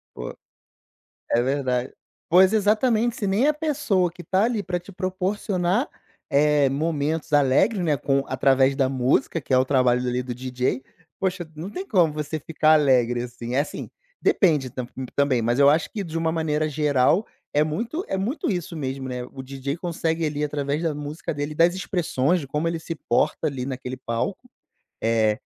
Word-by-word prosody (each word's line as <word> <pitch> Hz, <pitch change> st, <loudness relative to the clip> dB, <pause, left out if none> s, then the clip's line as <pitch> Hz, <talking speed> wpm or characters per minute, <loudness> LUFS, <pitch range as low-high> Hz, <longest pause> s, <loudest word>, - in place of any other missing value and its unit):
Pô. -, -, -6 dB, 1.0 s
É 120 Hz, -, +4 dB
verdade. 130 Hz, -1 st, -1 dB, 0.3 s
Pois 185 Hz, +3 st, +6 dB
exatamente, 220 Hz, +2 st, +2 dB
se 200 Hz, -, -2 dB
nem 215 Hz, +9 st, +2 dB
a 300 Hz, -, +4 dB
pessoa 280 Hz, -, 0 dB
que 175 Hz, 0 st, -11 dB
tá 190 Hz, +5 st, +1 dB
ali 225 Hz, -4 st, -1 dB
para 180 Hz, -1 st, -2 dB
te 180 Hz, +3 st, -13 dB
proporcionar, 185 Hz, -, -1 dB, 0.4 s
eh, 145 Hz, 0 st, +4 dB
momentos 155 Hz, +2 st, -1 dB
alegres, 145 Hz, -, +3 dB
né, 155 Hz, -3 st, +2 dB
com 135 Hz, +1 st, 0 dB
através 135 Hz, 0 st, +3 dB
da 135 Hz, -2 st, +2 dB
música, 130 Hz, +4 st, +1 dB
que 130 Hz, -, -4 dB
é -, -, +6 dB
o 130 Hz, -, +4 dB
trabalho 125 Hz, -2 st, +3 dB
ali 125 Hz, 0 st, -1 dB
do 125 Hz, -1 st, -5 dB
DJ, 125 Hz, +1 st, -2 dB, 0.4 s
poxa, 180 Hz, -3 st, -2 dB
não 170 Hz, +6 st, -6 dB
tem 375 Hz, -, -6 dB
como 175 Hz, -8 st, +3 dB
você 150 Hz, +1 st, -4 dB
ficar 155 Hz, +1 st, +2 dB
alegre 125 Hz, -5 st, +3 dB
assim. 120 Hz, 0 st, -6 dB
É 135 Hz, -, +3 dB
assim, 145 Hz, -, -3 dB, 0.3 s
depende 150 Hz, -, +2 dB
tamb 125 Hz, -2 st, -5 dB, 0.3 s
também, 135 Hz, -5 st, +2 dB
mas 120 Hz, +4 st, +1 dB
eu 140 Hz, 0 st, +7 dB
acho 155 Hz, +2 st, +1 dB
que 205 Hz, -3 st, -3 dB
de 165 Hz, -1 st, -5 dB
uma 165 Hz, 0 st, 0 dB
maneira 155 Hz, -1 st, 0 dB
geral, 150 Hz, -, +2 dB, 0.3 s
é 150 Hz, +1 st, +4 dB
muito 230 Hz, -, -3 dB
é 190 Hz, -, -2 dB
muito 245 Hz, +10 st, -2 dB
isso 175 Hz, -3 st, -3 dB
mesmo, 135 Hz, -2 st, -4 dB
né, 125 Hz, -1 st, -4 dB
o 130 Hz, -1 st, -8 dB
DJ 135 Hz, +3 st, -4 dB
consegue 165 Hz, -2 st, -1 dB
ali 150 Hz, 0 st, -2 dB
através 145 Hz, +1 st, -1 dB
da 160 Hz, -3 st, -1 dB
música 150 Hz, +1 st, -5 dB
dele 145 Hz, +1 st, -3 dB
e -, -, -7 dB
das 170 Hz, +3 st, +4 dB
expressões, 175 Hz, -4 st, 0 dB
de 140 Hz, -, -7 dB
como 150 Hz, +4 st, -1 dB
ele 165 Hz, -1 st, -2 dB
se 165 Hz, 0 st, -5 dB
porta 145 Hz, +5 st, +1 dB
ali 135 Hz, -4 st, -2 dB
naquele 130 Hz, -1 st, -5 dB
palco, 130 Hz, -, -4 dB, 0.5 s
eh, 110 Hz, -1 st, +2 dB
150 Hz, 185 wpm, -24 LUFS, 130-180 Hz, 1.0 s, eu